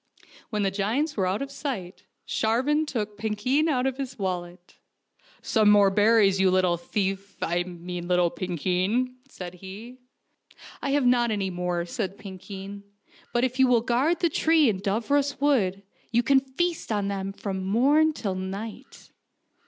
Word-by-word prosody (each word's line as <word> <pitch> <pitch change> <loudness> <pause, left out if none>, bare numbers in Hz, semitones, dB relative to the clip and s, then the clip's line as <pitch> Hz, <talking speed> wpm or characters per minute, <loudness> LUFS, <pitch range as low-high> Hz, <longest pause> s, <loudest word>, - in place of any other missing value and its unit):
When 210 -2 -1
the 195 - +1
giants 230 +11 -1
were 190 -3 +1
out 195 +8 -1
of 275 - -7
sight, 240 -11 -5 0.2
Sharvan 275 +8 +1
took 210 -6 -4
Pinkeen 240 +9 +1
out 255 -4 +1
of 265 -1 -1
his 265 -2 -5
wallet. 180 -3 -5 0.3
" - - -52 0.3
Some 215 -2 +3
more 205 -1 +6
berries, 205 -1 +4
you 190 - +5
little 185 -1 +3
thief 195 +3 -3
I 175 +1 0
mean 175 0 -6
little 180 -1 +2
Pinkeen," 185 - -1
said 180 -7 -8
he. 200 +7 -10 0.4
" - - -19
I 280 - -2
have 285 -2 +2
not 245 -1 +4
any 200 -3 -1
more," 175 -1 -2
said 195 +2 -4
Pinkeen; 195 0 -8 0.3
" - - -28
but 240 0 +1
if 255 0 -1
you 265 - +6
will 245 -2 +4
guard 265 +9 +1
the 340 - +3
tree 320 -3 +3
in 195 -3 -1
Dooros 270 +8 0
Wood 205 -10 +1 0.3
you 235 +1 +3
can 270 +3 +5
feast 290 +4 -3
on 205 -2 0
them 195 -1 -3
from 195 -1 -4
morn 280 +11 +3
till 210 -10 -3
night." 200 +7 -7
210 Hz, 170 wpm, -26 LUFS, 190-255 Hz, 0.4 s, more